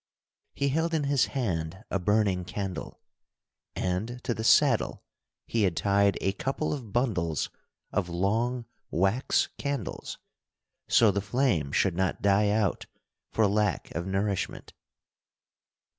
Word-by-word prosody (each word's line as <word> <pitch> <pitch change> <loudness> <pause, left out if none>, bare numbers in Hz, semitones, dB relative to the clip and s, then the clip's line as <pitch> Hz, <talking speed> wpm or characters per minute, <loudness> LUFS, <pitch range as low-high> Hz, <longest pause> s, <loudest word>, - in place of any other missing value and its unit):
He 140 - +1
held 160 +4 0
in 155 - +1
his 140 -2 +2
hand 95 -5 -2
a 95 - +1
burning 100 -1 +2
candle, 95 -2 -5 0.8
and 100 +7 -2
to 120 - 0
the 110 - -5
saddle - - +4 0.4
he 115 - 0
had 90 -5 +1
tied 100 +3 +3
a 95 - +2
couple 135 +9 -2
of 125 -8 -6
bundles 90 - 0 0.4
of 95 -3 -1
long 115 +8 0 0.2
wax 95 - +1
candles, 140 -7 -4 0.7
so 110 -3 +5
the 100 +1 -1
flame 100 - +1
should 90 +3 +2
not 95 0 -1
die 100 +1 +4
out 105 -2 0 0.4
for 110 - +3
lack 105 -1 0
of 85 +3 -3
nourishment. 95 0 -2
100 Hz, 130 wpm, -28 LUFS, 95-120 Hz, 0.8 s, so